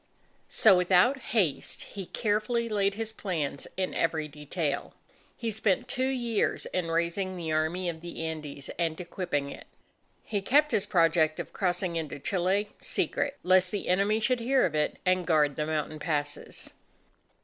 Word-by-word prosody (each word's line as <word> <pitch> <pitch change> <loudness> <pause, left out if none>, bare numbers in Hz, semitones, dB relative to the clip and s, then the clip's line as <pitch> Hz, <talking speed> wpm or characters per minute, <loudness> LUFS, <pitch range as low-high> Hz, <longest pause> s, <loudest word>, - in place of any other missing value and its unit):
So 215 -4 +6
without 185 +9 +4 0.2
haste, 170 -10 0
he 195 -3 -8
carefully 220 +2 0
laid 200 -2 +1
his 225 0 -4
plans 160 -10 -3
in 185 -1 -1
every 160 -2 0
detail. 150 +1 -3 0.4
He 230 -2 -2
spent 220 +2 +1
two 260 0 0
years 240 -5 0
in 180 -2 -2
raising 170 +3 -1
the 165 -2 -3
Army 160 +4 0
of 165 -2 -4
the 170 -1 -6
Andes 150 -3 -4
and 165 -2 0
equipping 170 -5 -2
it. - - -10 0.6
He 205 -2 -2
kept 290 +9 +3
his 200 - +1
project 165 -2 +3
of - - -6
crossing 180 -2 -1
into 155 -3 -4
Chile, 195 +6 0
secret, 285 0 -1
lest 185 0 +5
the 205 0 -4
enemy 200 +4 +3
should 250 +2 +1
hear 260 +3 +3
of 170 - -1
it 150 -1 0
and 185 -1 +2
guard 150 -4 +3
the 150 - -2
mountain 155 0 -2
passes. 145 -2 -3
180 Hz, 160 wpm, -28 LUFS, 160-210 Hz, 0.6 s, So